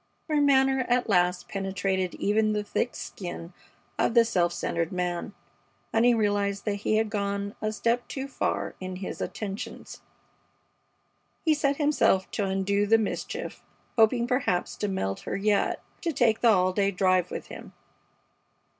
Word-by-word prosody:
Her 305 -2 +2
manner 265 -2 +4
at 245 -1 +2
last 180 -2 +2
penetrated 190 -1 -2
even 215 +1 +1
the 210 0 -1
thick 240 +3 -2
skin 175 -2 -7 0.5
of 235 - +1
the 235 -1 +7
self 175 -6 +1
centered 170 -1 -2
man, 180 -1 -3 0.6
and 225 - +3
he 245 -1 +5
realized 205 -2 0
that 205 -2 0
he 210 +1 0
had 215 -1 +1
gone 200 0 -2
a 215 - 0
step 235 +2 0
too 270 0 -5
far 275 - -2
in 185 0 -5
his 185 +1 -6
attentions. 200 -1 -6 1.4
He 315 - +5
set 285 -2 +1
himself 290 -10 +2
to 205 - -1
undo 195 +2 0
the 225 +2 +6
mischief, 220 -2 -4 0.3
hoping 235 +1 +4
perhaps 250 -8 0
to 210 - -1
melt 100 - -2
her - - -4
yet 205 0 +1 0.2
to 335 - 0
take 235 -6 +2
the 235 - +5
all 185 -3 +3
day 200 0 +2
drive 185 -2 +2
with - - -6
him. - - -9
205 Hz, 155 wpm, -27 LUFS, 190-235 Hz, 1.4 s, the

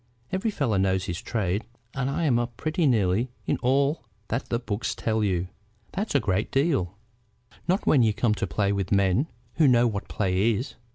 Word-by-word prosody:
Every 190 +4 0
fellow 135 - 0
knows 95 -1 +1
his 85 -1 -4
trade, 100 -2 -1 0.3
and 135 0 -1
I'm 140 -4 +1
up 120 -1 -4
pretty 155 +1 0
nearly 110 0 +2 0.2
in - - 0
all 140 +4 +1 0.3
that 115 +4 -2
the 120 - +1
books 115 -1 -3
tell 110 -1 0
you." 90 -3 0 0.4
"That's 205 -4 -3
a - - +6
great 100 -2 0
deal." 135 - +1 0.7
"Not 185 +3 +1
when 140 - +5
you 110 -2 +4
come 105 +1 +1
to - - -2
play 100 -1 0
with 100 -2 -2
men 100 - +3 0.3
who 155 -3 +5
know 120 -2 +5
what 105 -4 -2
play 100 +3 +1
is. 125 +7 -4
115 Hz, 185 wpm, -26 LUFS, 100-135 Hz, 0.7 s, a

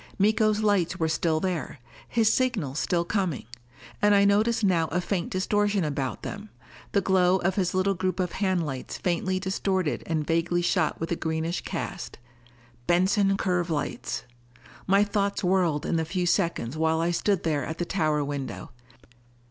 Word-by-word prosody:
Miko's 215 +1 +3
lights 195 -4 +1
were 160 -3 +1
still 160 0 +1
there. 180 -4 -3 0.3
His 225 -2 +3
signals 200 - 0
still 170 -1 0
coming. 185 - -1 0.6
And 205 0 +5
I 200 0 +5
noticed 215 +3 +2
now 175 -5 +3
a 170 +5 -1
faint 180 -1 -2
distortion 205 +1 +1
about 140 -4 -3
them, 210 +1 -6 0.4
the 200 - +2
glow 185 -1 +3
of 190 +1 0
his 185 -2 -1
little 190 +1 +2
group 185 +1 -2
of 180 -2 0
hand 185 -4 0
lights 135 -3 -5
faintly 185 +1 -1
distorted 190 -3 -1
and 155 -2 -1
vaguely 170 +2 +1
shot - - +1
with 165 - -4
a - - +2
greenish 160 +1 -2
cast. - - -5 0.7
Benson 195 +3 +3
curve 180 -3 0
lights! 150 -7 -3 0.6
My 195 +2 +5
thoughts 200 0 -1
whirled 180 -5 +1
in 165 - 0
the 160 - +1
few 180 +3 -2
seconds 170 - 0
while 160 0 +1
I 170 +1 +1
stood 195 +2 0
there 150 -4 0
at 160 +5 -5
the 175 - -2
tower 155 -5 0
window. 140 -3 -5
180 Hz, 165 wpm, -26 LUFS, 160-200 Hz, 0.7 s, And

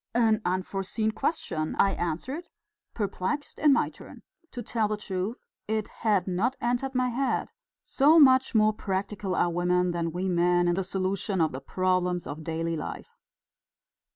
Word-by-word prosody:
"An 225 -2 +3
unforeseen 195 +4 -1
question," 175 - -2
I 195 - +4
answered, 220 - -4 0.5
perplexed 205 +6 -3
in 300 -1 +5
my 275 - +3
turn. - - -13 0.3
To 245 - -6
tell 220 -1 0
the 215 0 -2
truth, 195 +2 -4 0.2
it 215 0 -1
had 205 -5 +2
not 200 +8 0
entered 245 +3 -1
my 255 0 +2
head, 265 +3 -1 0.3
so 295 +4 +4
much 260 -4 +6
more 215 0 +5
practical 195 -1 -3
are 175 - +2
women 180 +1 +1
than 170 -1 -2
we 180 +3 -2
men 175 0 +2
in 175 - +3
the 190 +2 -1
solution 190 +1 -1
of 160 -2 +2
the 130 - -6
problems 180 +2 0
of 155 +2 -6
daily 165 +1 -2
life! 155 - -6
195 Hz, 155 wpm, -27 LUFS, 180-230 Hz, 0.5 s, much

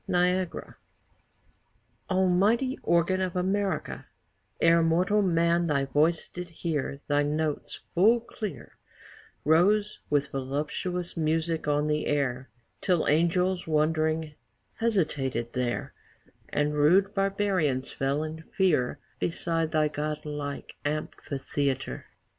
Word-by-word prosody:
NIAGARA 180 0 0 1.3
Almighty 195 +8 +2
organ 170 +2 +2
of 185 -1 -2
America, 195 +2 -1 0.5
E'er 165 0 +5
mortal 180 +6 +3
man 170 -2 +2
thy 140 -3 +1
voice 155 +5 +1
did 180 0 -7
hear 155 -4 -3
Thy 145 0 +3
notes, 150 +1 -2
full 215 +7 +5
clear, 215 -6 -7 0.7
Rose 205 +7 +3
with 140 -1 +1
voluptious 150 +6 -3
music 160 0 0
on 145 0 +2
the 150 0 0
air, 130 -3 -1 0.3
Till 180 -4 +1
angels, 175 +4 +2
wondering, 155 0 +1 0.4
hesitated 145 - 0
there, 125 -2 -2 0.6
And 150 0 0
rude 180 +7 +4
barbarians 195 -9 0
fell 140 +3 -1
in 155 +1 -6 0.2
fear 155 -10 +2 0.2
Beside 165 -1 -1
thy 155 -1 +2
god 150 +1 -4
like 145 -1 -5
amphitheatre. 140 - -3
160 Hz, 105 wpm, -28 LUFS, 145-180 Hz, 1.3 s, E'er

